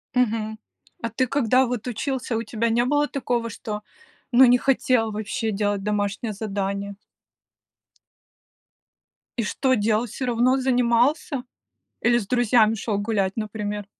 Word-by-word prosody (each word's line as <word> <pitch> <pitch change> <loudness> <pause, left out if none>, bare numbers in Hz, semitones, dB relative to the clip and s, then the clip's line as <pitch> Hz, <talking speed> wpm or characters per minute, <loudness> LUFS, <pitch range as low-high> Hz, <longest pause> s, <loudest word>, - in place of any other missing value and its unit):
Мгм. 220 -3 0 0.4
А 230 - -2
ты, 255 +4 0
когда 255 0 +3
вот 245 -1 -4
учился, 250 +1 -2
у 225 - -1
тебя 230 +1 -1
не 235 +1 +2
было 290 +3 +2
такого, 240 -5 -2
что, 210 -1 -6 0.5
ну, 255 +2 +7
не 245 0 +6
хотел 250 -3 +2
вообще 220 +1 -3
делать 205 -1 -1
домашнее 210 +1 -1
задание? 200 -1 -3 2.4
И 235 - 0
что, 260 +5 0
делал, 215 +1 +1
всё 245 +3 -5
равно 245 +2 +2
занимался? 250 +2 +1 0.6
Или 240 0 +4
с 210 - -5
друзьями 235 -2 +3
шел 215 -1 -2
гулять, 205 -2 -1
например? 210 -2 -4
230 Hz, 135 wpm, -24 LUFS, 210-250 Hz, 2.4 s, ну